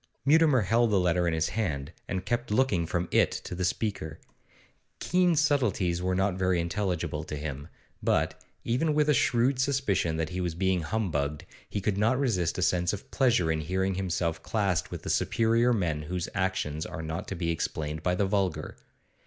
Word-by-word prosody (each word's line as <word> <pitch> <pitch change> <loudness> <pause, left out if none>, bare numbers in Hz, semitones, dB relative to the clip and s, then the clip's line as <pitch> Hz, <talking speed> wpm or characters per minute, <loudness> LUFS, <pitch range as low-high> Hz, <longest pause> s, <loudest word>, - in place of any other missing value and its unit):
Mutimer 150 -3 +5
held 115 +4 +2
the 100 -2 +3
letter 90 -1 +2
in 85 - +1
his 80 0 0
hand, 80 -9 -2 0.2
and 95 -1 -3
kept 120 +2 -1
looking 105 -7 +2
from 90 +1 -1
it - - +4
to - - -6
the 90 +1 -3
speaker. 95 -5 -2 0.8
Keene's 180 -3 +2
subtleties 110 - +1
were 90 0 0
not 95 +1 +1
very 95 -2 +2
intelligible 85 -3 -2
to 75 - -6
him, 70 -1 -5 0.3
but, - - 0 0.2
even 145 +6 +1
with 150 0 +3
a - - +6
shrewd 125 +1 +2
suspicion 130 - +1
that 80 -1 -1
he 90 +1 -3
was 85 -2 -2
being 95 0 +1
humbugged, 75 -7 -2 0.2
he - - -2
could 100 0 0
not 115 +4 +3
resist 105 - 0
a 95 - 0
sense 90 -1 +1
of 100 - -8
pleasure 120 -11 +2
in 80 -1 -1
hearing 95 +4 -1
himself 85 -3 -1
classed 100 -5 0
with - - -7
the - - -5
superior 115 +2 +2
men 85 -9 0
whose 85 +3 -3
actions 95 -6 -1
are 80 - -6
not 80 +2 -4
to 100 - -4
be 85 -1 -1
explained 80 -1 -3
by 90 +2 +1
the 100 - +1
vulgar. 95 -2 -1
95 Hz, 185 wpm, -28 LUFS, 85-115 Hz, 0.8 s, a